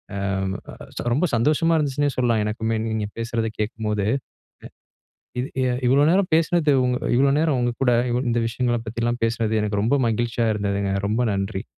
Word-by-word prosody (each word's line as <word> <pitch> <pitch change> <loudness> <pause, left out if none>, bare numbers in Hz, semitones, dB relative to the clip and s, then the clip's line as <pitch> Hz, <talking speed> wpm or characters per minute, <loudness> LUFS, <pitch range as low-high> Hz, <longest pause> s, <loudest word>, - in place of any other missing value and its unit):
ஆ - - -3 1.0
ரொம்ப 150 +8 +2
சந்தோஷமா 150 +8 +2
இருந்துச்சுன்னே 145 -1 0
சொல்லலாம், 120 -3 +1
எனக்குமே. 110 +1 -1
நீங்க 110 -1 -2
பேசுறத 115 0 -2
கேட்கும்போது. 105 -1 -2 1.3
இது 125 - -1 0.2
எ - - +1 0.2
இவ்வளவு 140 +3 +4
நேரம் 185 +2 +2
பேசினது, 160 -2 +2
உங் 125 0 +1 0.2
இவ்வளவு 135 +2 +3
நேரம், 155 -3 +2
உங்க 120 0 0
கூட 125 -2 +4 0.2
இவ் 125 +2 0
இந்த 120 0 +1
விஷயங்களப் 120 0 -1
பத்தில்லாம் 120 +2 -2
பேசினது, 115 -1 -1
எனக்கு 105 -1 -1
ரொம்ப 120 +6 +2
மகிழ்ச்சியா 115 0 0
இருந்ததுங்க. 100 -1 -1 0.2
ரொம்ப 115 +4 +1
நன்றி. 100 -1 -3
120 Hz, 155 wpm, -23 LUFS, 110-135 Hz, 1.3 s, இவ்வளவு